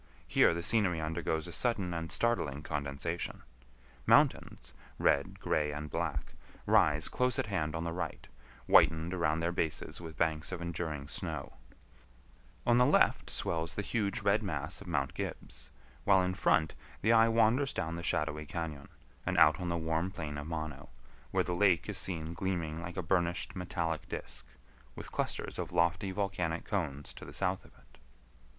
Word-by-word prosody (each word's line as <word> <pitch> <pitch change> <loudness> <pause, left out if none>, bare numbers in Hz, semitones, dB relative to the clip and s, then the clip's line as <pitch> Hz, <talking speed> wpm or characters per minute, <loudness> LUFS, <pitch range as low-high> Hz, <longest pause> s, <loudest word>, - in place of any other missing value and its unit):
Here - - +5
the 85 - -3
scenery 95 -5 +2
undergoes 80 0 -1
a 85 - -7
sudden 100 -2 0
and 80 -1 -4
startling 75 -12 0
condensation. 75 +3 -3 0.6
Mountains, 60 +2 +3 0.2
red, 95 +8 +2
gray, 75 -4 +1
and 75 0 -5
black, - - -2 0.3
rise 75 +1 +4
close 125 +1 +1
at 135 - +1
hand 85 -7 -1
on 80 - -2
the 85 - -2
right, 90 -2 -4 0.4
whitened 80 +2 +5
around 80 -3 +1
their 85 +1 +1
bases 80 -1 -2
with 80 -3 -8
banks 80 0 0
of 90 - -3
enduring 80 -4 -4
snow; - - -3 1.1
on 120 0 +5
the 125 - +6
left - - +3
swells 80 0 -1
the 105 - -2
huge 100 -1 -1
red 100 +2 +3
mass 80 -1 -4
of 100 - -10
Mount 70 -6 0
Gibbs, 65 -1 -5 0.3
while 95 -2 +5
in 90 0 0
front 80 -3 +2 0.3
the 110 +2 +5
eye 115 0 +6
wanders 115 +5 +3
down 80 +1 -2
the 85 - -5
shadowy 75 -2 -1
cañon, 80 -4 -5 0.4
and - - -1
out 75 -1 +6
on 90 -1 -2
the 85 - 0
warm 80 +2 0
plain 80 -6 -5
of 75 - -6
Mono, 80 -5 -5 0.4
where - - +2
the 90 - -2
lake 90 -3 +3
is - - 0
seen 85 -3 -2
gleaming 85 -3 -2
like 85 +2 -7
a 90 - -1
burnished 90 0 0
metallic 85 -4 -2
disk, - - -5 0.5
with - - -8
clusters - - -2
of 90 -1 -3
lofty 85 +3 +2
volcanic 95 -4 -2
cones 75 -8 -2
to - - -11
the - - -9
south 90 +1 0
of - - -19
it. - - -23
85 Hz, 170 wpm, -32 LUFS, 80-95 Hz, 1.1 s, the